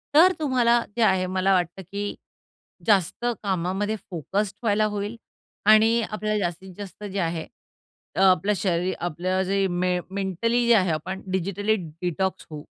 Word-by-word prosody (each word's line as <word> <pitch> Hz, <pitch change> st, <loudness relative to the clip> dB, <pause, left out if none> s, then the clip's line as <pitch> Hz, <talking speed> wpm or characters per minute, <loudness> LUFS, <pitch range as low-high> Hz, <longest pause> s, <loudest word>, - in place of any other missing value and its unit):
तर 355 Hz, +5 st, +8 dB
अतुम्हाला 255 Hz, -7 st, +2 dB, 0.2 s
जे 235 Hz, -, -1 dB
आहे 190 Hz, -3 st, +3 dB
मला 190 Hz, +1 st, +2 dB
वाटतं 180 Hz, +1 st, 0 dB
की 205 Hz, 0 st, -3 dB, 0.7 s
जास्त 200 Hz, +1 st, +2 dB, 0.2 s
कामामध्ये 195 Hz, +2 st, -1 dB
फोकस्ड 195 Hz, +4 st, -2 dB
व्हायला 215 Hz, -1 st, +2 dB
होईल 205 Hz, +1 st, -3 dB, 0.6 s
आणि 225 Hz, +2 st, +5 dB
आपल्याला 215 Hz, 0 st, -1 dB
जास्तीत 180 Hz, +2 st, -6 dB
जास्त 205 Hz, 0 st, -9 dB
जे 200 Hz, -1 st, -4 dB
आहे 165 Hz, -2 st, -2 dB, 0.7 s
अ, -, -, -1 dB
आपलं 190 Hz, +1 st, +4 dB
शरीर. 180 Hz, 0 st, 0 dB
आपलं 180 Hz, +3 st, -1 dB
जे 195 Hz, 0 st, +1 dB
मे 180 Hz, 0 st, +1 dB
मेंटली 200 Hz, +5 st, 0 dB
जे 235 Hz, -, +6 dB
आहे, 185 Hz, -4 st, +3 dB
आपण 185 Hz, +5 st, -4 dB
डिजिटली 200 Hz, +3 st, 0 dB
डिटॉक्स 180 Hz, +2 st, -3 dB
होऊ. 150 Hz, -1 st, -8 dB
195 Hz, 145 wpm, -25 LUFS, 180-210 Hz, 0.7 s, तर